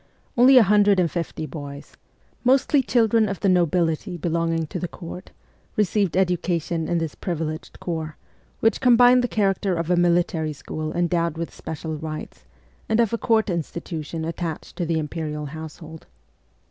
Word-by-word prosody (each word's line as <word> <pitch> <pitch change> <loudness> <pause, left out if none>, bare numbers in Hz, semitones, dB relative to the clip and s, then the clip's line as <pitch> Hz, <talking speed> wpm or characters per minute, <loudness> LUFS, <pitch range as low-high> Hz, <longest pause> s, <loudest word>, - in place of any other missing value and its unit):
Only 255 +2 +7
a 245 - +9
hundred 205 -1 +4
and 170 -4 +2
fifty 165 -2 -3
boys 145 -2 -8 0.5
mostly 270 +3 +4
children 225 -4 +2
of 195 - -4
the - - +2
nobility 175 0 +1
be 170 +1 -2
longing 165 0 0
to 175 - -5
the 180 - -3
court 180 +2 -9 0.5
received 200 -3 +1
education 175 -3 0
in 175 - 0
this 165 -3 -2
privileged 160 -3 -5
corps, 160 -3 -4 0.4
which 225 - +2
combined 245 0 +6
the - - +1
character 195 -3 0
of 170 +1 -2
a - - +5
military 170 -3 +1
school 155 +2 -5
endowed 170 -2 0
with 170 0 -4
special 160 0 -5
rights 155 0 -7 0.4
and 220 +1 +2
of 230 -2 +2
a - - +1
court 225 -2 +2
institution 165 -2 -4
attached 165 -1 -5
to 175 - -2
the 165 -1 +1
imperial 150 -1 -4
household. 160 +1 -9
170 Hz, 160 wpm, -23 LUFS, 160-200 Hz, 0.5 s, a